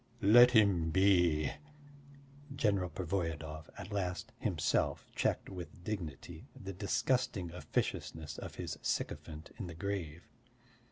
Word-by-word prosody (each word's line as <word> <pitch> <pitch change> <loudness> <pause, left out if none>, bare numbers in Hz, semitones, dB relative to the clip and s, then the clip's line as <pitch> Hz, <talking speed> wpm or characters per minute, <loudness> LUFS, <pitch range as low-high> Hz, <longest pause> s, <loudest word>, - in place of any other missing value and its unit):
"Let 120 +5 +9
him 100 -8 +4
be." 90 -4 +4 1.0
General 100 -7 +1
Pervoyedov 80 -2 -3
at 100 +1 -8
last 90 -3 -2
himself - - 0
checked - - 0
with 90 -1 -8
dignity 85 -9 -5
the 95 - -6
disgusting 100 -1 0
officiousness 80 -3 -3
of - - -7
his - - -5
sycophant 75 +1 -3
in 100 - -4
the 85 - -8
grave. 85 -3 -4
90 Hz, 110 wpm, -34 LUFS, 80-100 Hz, 1.0 s, Let